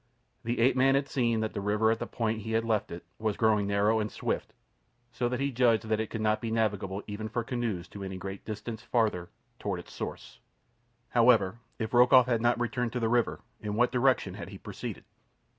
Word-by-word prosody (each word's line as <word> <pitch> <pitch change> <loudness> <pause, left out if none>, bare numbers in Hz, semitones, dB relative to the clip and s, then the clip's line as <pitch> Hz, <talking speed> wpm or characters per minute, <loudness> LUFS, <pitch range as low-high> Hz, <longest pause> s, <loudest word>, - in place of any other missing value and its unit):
The 120 +1 -2
ape 125 +2 +4
man 135 +1 +4
had 140 0 +1
seen 120 -5 +1
that 110 - -2
the 100 - -3
river 105 +2 +2
at 115 - 0
the - - -4
point 115 -1 -1
he 110 +2 -4
had 115 0 +1
left 110 -3 0
it 85 0 -8
was 110 -2 -1
growing 105 -3 +3
narrow 100 +2 +2
and 105 0 -2
swift, - - -3 0.6
so 120 0 -1
that 125 0 -2
he 140 0 0
judged 115 -3 +2
that 110 -1 +1
it 110 - -2
could 110 - -4
not 110 0 +1
be 115 - -3
navigable 105 -3 -1
even 110 +1 -5
for 120 +1 -2
canoes 115 -8 -3
to 100 - -8
any 95 -1 -5
great 95 +1 -7
distance 110 +1 -6
farther 110 -7 0 0.3
toward 100 -4 -2
its 85 - -12
source. - - -7 0.7
However, 115 -4 +4 0.2
if 110 0 -4
Rokoff 125 +1 +7
had 120 -2 +1
not 120 0 +2
returned 120 0 -1
to 125 - -1
the 115 -1 +1
river, 120 0 +1 0.2
in 105 -1 -4
what 120 +2 +3
direction 130 +1 +2
had - - -7
he - - -9
proceeded? - - -7
110 Hz, 215 wpm, -29 LUFS, 105-120 Hz, 0.7 s, Rokoff